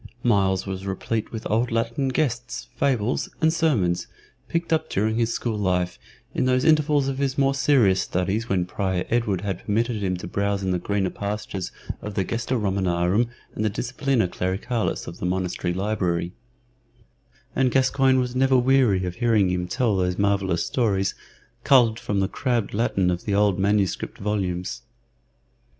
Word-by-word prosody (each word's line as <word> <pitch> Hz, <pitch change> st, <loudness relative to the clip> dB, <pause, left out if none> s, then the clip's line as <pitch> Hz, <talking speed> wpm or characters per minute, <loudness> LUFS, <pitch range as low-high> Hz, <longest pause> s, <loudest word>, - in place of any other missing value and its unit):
Myles 95 Hz, -5 st, +2 dB
was 95 Hz, 0 st, -5 dB
replete 105 Hz, +3 st, -2 dB
with 110 Hz, -1 st, -6 dB
old 115 Hz, +3 st, +1 dB
Latin 115 Hz, +4 st, 0 dB
gestes, 125 Hz, -3 st, -2 dB
fables, 125 Hz, -3 st, 0 dB
and 160 Hz, 0 st, +3 dB
sermons 115 Hz, -, +1 dB, 0.4 s
picked 170 Hz, 0 st, -1 dB
up 160 Hz, -, 0 dB
during 110 Hz, +3 st, 0 dB
his 115 Hz, 0 st, +1 dB
school 115 Hz, -2 st, -2 dB
life, 90 Hz, -2 st, 0 dB, 0.3 s
in -, -, 0 dB
those 130 Hz, 0 st, +2 dB
intervals 150 Hz, -3 st, +3 dB
of 135 Hz, 0 st, -2 dB
his 140 Hz, -1 st, -1 dB
more 135 Hz, 0 st, +3 dB
serious 125 Hz, -9 st, +3 dB
studies 100 Hz, +7 st, -1 dB
when 90 Hz, -2 st, +1 dB
Prior 95 Hz, -1 st, -2 dB
Edward 110 Hz, -6 st, +1 dB
had 95 Hz, -3 st, -3 dB
permitted 110 Hz, +1 st, 0 dB
him 95 Hz, -2 st, -1 dB
to 90 Hz, -, -7 dB
browse 100 Hz, 0 st, -1 dB
in 95 Hz, -, 0 dB
the 90 Hz, -, 0 dB
greener 95 Hz, 0 st, -1 dB
pastures 100 Hz, -2 st, -4 dB, 0.3 s
of 105 Hz, -1 st, -6 dB
the 95 Hz, -, +1 dB
Gesta 120 Hz, +6 st, -2 dB
Romanorum 95 Hz, +1 st, +1 dB, 0.2 s
and 110 Hz, -, -3 dB
the 110 Hz, -, +2 dB
Disciplina 125 Hz, +1 st, 0 dB
Clericalis 95 Hz, +7 st, -2 dB
of 85 Hz, -, -9 dB
the -, -, -3 dB
monastery 90 Hz, -1 st, -1 dB
library, 90 Hz, -3 st, -1 dB, 1.2 s
and 130 Hz, -1 st, +3 dB
Gascoyne 130 Hz, +1 st, +3 dB
was 125 Hz, -1 st, -2 dB
never 130 Hz, 0 st, +4 dB
weary 125 Hz, -7 st, +3 dB
of 90 Hz, -1 st, -5 dB
hearing 110 Hz, -6 st, +3 dB
him 90 Hz, 0 st, -1 dB
tell 115 Hz, +1 st, +1 dB
those 90 Hz, -1 st, 0 dB
marvellous 100 Hz, -4 st, +1 dB
stories 100 Hz, -6 st, 0 dB, 0.5 s
culled 120 Hz, -4 st, +5 dB
from 100 Hz, -1 st, -1 dB
the 95 Hz, -, +1 dB
crabbed 120 Hz, 0 st, -1 dB
Latin 100 Hz, -4 st, +1 dB
of 90 Hz, 0 st, -4 dB
the 100 Hz, -, 0 dB
old 100 Hz, -2 st, +3 dB
manuscript 100 Hz, -1 st, 0 dB
volumes. 95 Hz, -7 st, -2 dB
105 Hz, 165 wpm, -24 LUFS, 95-125 Hz, 1.2 s, culled